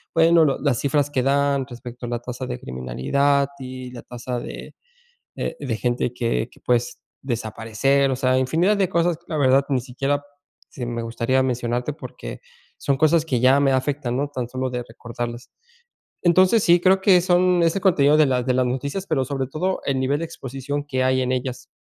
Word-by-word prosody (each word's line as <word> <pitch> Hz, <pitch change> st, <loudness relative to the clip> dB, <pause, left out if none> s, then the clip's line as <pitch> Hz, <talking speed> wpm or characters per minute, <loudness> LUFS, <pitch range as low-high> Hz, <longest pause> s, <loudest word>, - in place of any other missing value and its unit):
bueno, 165 Hz, 0 st, +5 dB
lo 135 Hz, -, +1 dB
las 140 Hz, -5 st, +1 dB
cifras 145 Hz, 0 st, +1 dB
que 130 Hz, -3 st, 0 dB
dan, 140 Hz, -1 st, +2 dB
respecto 120 Hz, 0 st, -9 dB
a -, -, -5 dB
la 120 Hz, -, -2 dB
tasa 125 Hz, +2 st, -6 dB
de 125 Hz, 0 st, -5 dB
criminalidad, 135 Hz, -, 0 dB
y 130 Hz, -1 st, -7 dB
la 120 Hz, -1 st, -9 dB
tasa 125 Hz, 0 st, -5 dB
de -, -, -8 dB, 0.6 s
de 125 Hz, -6 st, -3 dB
gente, 120 Hz, 0 st, -1 dB
que 115 Hz, -2 st, -1 dB
que, -, -, -20 dB
pues, 120 Hz, 0 st, 0 dB, 0.2 s
desaparecer. 120 Hz, +3 st, 0 dB
O -, -, 0 dB
sea, 130 Hz, 0 st, +1 dB
infinidad 170 Hz, +10 st, +2 dB
de 190 Hz, -2 st, +2 dB
cosas, 170 Hz, -2 st, +1 dB
la 160 Hz, -, -4 dB
verdad 135 Hz, 0 st, +4 dB
ni 130 Hz, -3 st, +1 dB
siquiera, 135 Hz, +3 st, -2 dB, 0.5 s
sí 125 Hz, -, -6 dB
me 120 Hz, -1 st, -3 dB
gustaría 115 Hz, +3 st, 0 dB
mencionarte, 125 Hz, +1 st, -1 dB
porque, -, -, -9 dB, 0.4 s
son 140 Hz, -1 st, 0 dB
cosas 155 Hz, +2 st, +3 dB
que 130 Hz, -7 st, 0 dB
ya 130 Hz, +3 st, +5 dB
me 135 Hz, -1 st, +3 dB
afectan, 130 Hz, -2 st, -1 dB
¿no?, 145 Hz, +1 st, -1 dB
tan 125 Hz, -4 st, -4 dB
solo 130 Hz, 0 st, -3 dB
de 125 Hz, -1 st, -4 dB
recordarlas. 120 Hz, +1 st, -7 dB, 0.7 s
Entonces, 185 Hz, +5 st, +4 dB
sí, 175 Hz, 0 st, +5 dB
creo 190 Hz, +1 st, +4 dB
que 190 Hz, -2 st, +6 dB
son 180 Hz, -1 st, +3 dB
ese 170 Hz, +3 st, +1 dB
contenido, 150 Hz, -6 st, +4 dB
de 155 Hz, -, +6 dB
las 125 Hz, -1 st, 0 dB
de 130 Hz, -, +1 dB
las 130 Hz, -1 st, +2 dB
noticias, 140 Hz, +10 st, -3 dB
pero, 130 Hz, -, 0 dB
sobre 135 Hz, 0 st, -3 dB
todo 180 Hz, +8 st, -2 dB
el 135 Hz, -1 st, 0 dB
nivel 140 Hz, +3 st, 0 dB
de 165 Hz, -, -2 dB
exposición 135 Hz, 0 st, -5 dB
que 130 Hz, -3 st, -1 dB
hay 130 Hz, 0 st, +2 dB
en 130 Hz, 0 st, -1 dB
ellas. 130 Hz, 0 st, -4 dB
130 Hz, 195 wpm, -22 LUFS, 125-145 Hz, 0.7 s, que